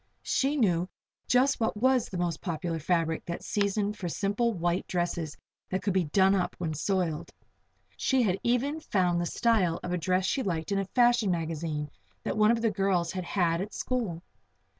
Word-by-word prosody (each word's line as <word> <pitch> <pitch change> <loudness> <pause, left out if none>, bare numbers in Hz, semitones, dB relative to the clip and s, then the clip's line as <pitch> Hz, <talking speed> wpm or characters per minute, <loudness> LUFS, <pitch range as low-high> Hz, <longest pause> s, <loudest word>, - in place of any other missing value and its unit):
She 280 +2 +1
knew 180 -7 +2 0.4
just 260 +2 +3
what 220 -2 0
was 255 +1 +3
the 185 - -5
most 175 -3 -1
popular 165 -1 -3
fabric 165 0 0
that 170 - -5
season 205 0 0
for 190 -4 -5
simple 205 +7 0
white 175 -2 -1
dresses 175 -3 -2 0.3
that 185 - -2
could 200 - +1
be 185 -2 +2
"done 190 +5 +4
up" 185 -2 0
when 165 -3 -2
soiled. 175 -1 -1 0.7
She 265 -2 +2
had 190 -3 +1
even 260 +6 +1
found 180 - +1
the 175 - -1
style 195 -8 +2
of 180 - -4
a 180 - 0
dress 185 +2 +1
she 265 - 0
liked 170 -4 -2
in 200 - +2
a 195 - -1
fashion 240 0 +3
magazine 160 -3 -2 0.3
that - - -2
one 215 0 +4
of 230 0 +2
the 225 - +3
girls 195 -4 +1
had 185 -1 -4
had 170 -2 +1
at 205 +2 -6
school. 210 -10 -2
185 Hz, 185 wpm, -29 LUFS, 170-215 Hz, 0.7 s, done